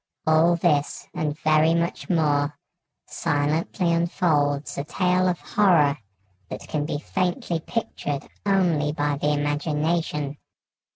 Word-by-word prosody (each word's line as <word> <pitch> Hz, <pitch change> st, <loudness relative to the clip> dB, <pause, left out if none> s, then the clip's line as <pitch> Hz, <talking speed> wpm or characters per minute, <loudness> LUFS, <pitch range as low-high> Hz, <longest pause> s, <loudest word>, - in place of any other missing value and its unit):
All 160 Hz, +2 st, +4 dB
this, 150 Hz, -4 st, 0 dB
and 150 Hz, -1 st, -2 dB
very 155 Hz, +1 st, +4 dB
much 170 Hz, +1 st, -2 dB
more, 150 Hz, -4 st, +1 dB, 0.5 s
silently 160 Hz, +5 st, 0 dB
unfolds 155 Hz, -4 st, 0 dB
a -, -, -2 dB
tale 180 Hz, +4 st, +1 dB
of 180 Hz, -1 st, 0 dB
horror 155 Hz, -9 st, +3 dB, 0.5 s
that -, -, -6 dB
can 150 Hz, -1 st, -3 dB
be 145 Hz, -, -2 dB
faintly 175 Hz, +2 st, -2 dB
pictured 150 Hz, -8 st, -4 dB, 0.2 s
only 175 Hz, -7 st, +2 dB
by 145 Hz, -1 st, -1 dB
the 145 Hz, -, 0 dB
imagination. 150 Hz, 0 st, -1 dB
155 Hz, 115 wpm, -24 LUFS, 145-170 Hz, 0.5 s, All